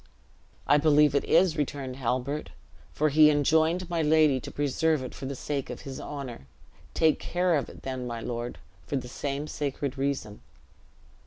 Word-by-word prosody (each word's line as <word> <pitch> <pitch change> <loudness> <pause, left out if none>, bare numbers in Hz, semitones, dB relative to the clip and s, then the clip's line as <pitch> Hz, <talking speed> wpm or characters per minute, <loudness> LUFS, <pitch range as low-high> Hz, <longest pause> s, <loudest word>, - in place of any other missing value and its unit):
"I 145 +1 +5
believe 150 -1 +5
it 140 - +2
is," 180 -3 +4
returned 135 -3 -3
Halbert, 130 +3 -2 0.4
"for 155 +1 +1
he 150 +1 +7
enjoined 160 +4 +2
my 170 -1 -1
lady 155 -3 +4
to - - -8
preserve 145 +1 0
it 125 - -7
for 135 - -6
the 140 - -4
sake 140 +1 -3
of - - -6
his 135 -3 -7
honor. 130 - -7 0.5
Take 160 -1 +3
care 180 0 0
of 145 - -1
it, - - -13
then, 130 -2 -4
my 120 -1 -4
lord, 120 +1 -4 0.3
for - - -2
the 125 -2 -3
same 140 +3 -3
sacred 140 -2 -3
reason." 135 -7 -2
140 Hz, 170 wpm, -27 LUFS, 130-155 Hz, 0.5 s, he